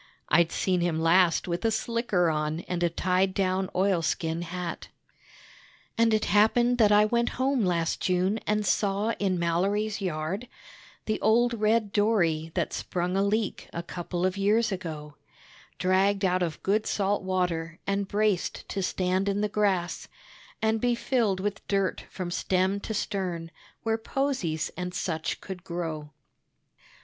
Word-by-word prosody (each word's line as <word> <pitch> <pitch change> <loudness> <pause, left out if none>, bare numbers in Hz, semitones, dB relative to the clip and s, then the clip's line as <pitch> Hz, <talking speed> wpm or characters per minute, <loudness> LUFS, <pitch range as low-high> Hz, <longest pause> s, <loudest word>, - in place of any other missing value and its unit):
(I'd 170 +1 +4
seen 185 -2 0
him 170 -2 0
last 170 +2 +3
with 170 0 -2
a 225 - +3
slicker 220 -6 +1
on 155 +1 -1
and 180 -1 -4
a 175 - +3
tied 185 +2 +1
down 190 -1 0
oilskin 170 -3 0
hat.) 175 0 -5 1.1
And 230 0 +3
it 215 0 +2
happened 235 +5 +3
that 210 -2 +5
I 210 0 +6
went 235 +2 +1
home 260 -2 +1
last 170 -3 0
June, 185 +4 +1
and 210 0 +1
saw 200 +2 +1
in 190 -2 +1
Mallory's 200 +5 0
yard 180 +5 -3 0.6
The 215 -1 -1
old 235 +3 +3
red 215 -1 +1
dory 170 -7 +2
that - - -1
sprung 180 +1 -2
a 195 - +2
leak 210 +2 -1
a 170 - -4
couple 175 +1 -3
of 185 +1 0
years 215 +3 +2
ago, 155 -5 -6 0.6
Dragged 195 +2 +2
out 185 0 +2
of 165 -3 -3
good 210 +2 +1
salt 200 0 0
water 180 -3 -1
and 200 0 -1
braced 205 -2 0
to 195 - -2
stand 185 +1 0
in 200 +1 0
the 210 - +2
grass 195 -4 0 0.6
And 220 0 +2
be 245 -1 +2
filled 230 -6 0
with 200 0 -4
dirt 195 -2 0
from 180 -2 -5
stem 185 +2 +1
to 220 +2 -5
stern, 180 -5 -3 0.3
where 225 0 0
posies 225 - -1
and 180 0 -5
such 160 -3 -2
could 185 -3 -8
grow. 160 -3 -4
190 Hz, 155 wpm, -27 LUFS, 175-210 Hz, 1.1 s, I